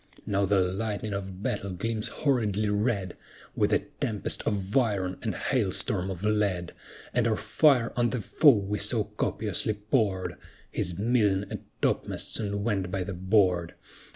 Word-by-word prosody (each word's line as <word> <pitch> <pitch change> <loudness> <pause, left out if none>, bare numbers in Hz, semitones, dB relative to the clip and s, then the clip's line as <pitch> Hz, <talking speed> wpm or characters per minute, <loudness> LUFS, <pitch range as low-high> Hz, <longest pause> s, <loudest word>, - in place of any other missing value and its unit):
Now 100 0 +1
the 100 0 +3
lightning 100 +3 -2
of 95 0 -5
battle 100 - -2
gleams 110 +4 -2
horridly 110 -7 0
red, 105 -3 0 0.4
With - - +2
a - - +2 0.2
tempest 105 -3 -1
of 100 -1 -1
iron 100 -8 +1
and - - -2
hail - - 0
storm 90 +2 -1
of 95 0 -5
lead; 105 -5 0 0.4
And 120 -1 +2
our 110 - +2
fire 130 -2 +3
on 120 -1 +2
the 125 - -2
foe 140 +4 +5
we 100 +1 -2
so - - +2
copiously 110 - -2
poured, 105 -3 0 0.3
His 85 -1 -2
mizzen 105 -3 +2
and - - -6 0.2
topmasts - - 0
soon 100 -2 -1
went 100 -5 0
by 95 0 -1
the 95 +2 -5
board. 90 -2 +2
100 Hz, 155 wpm, -28 LUFS, 95-110 Hz, 0.4 s, foe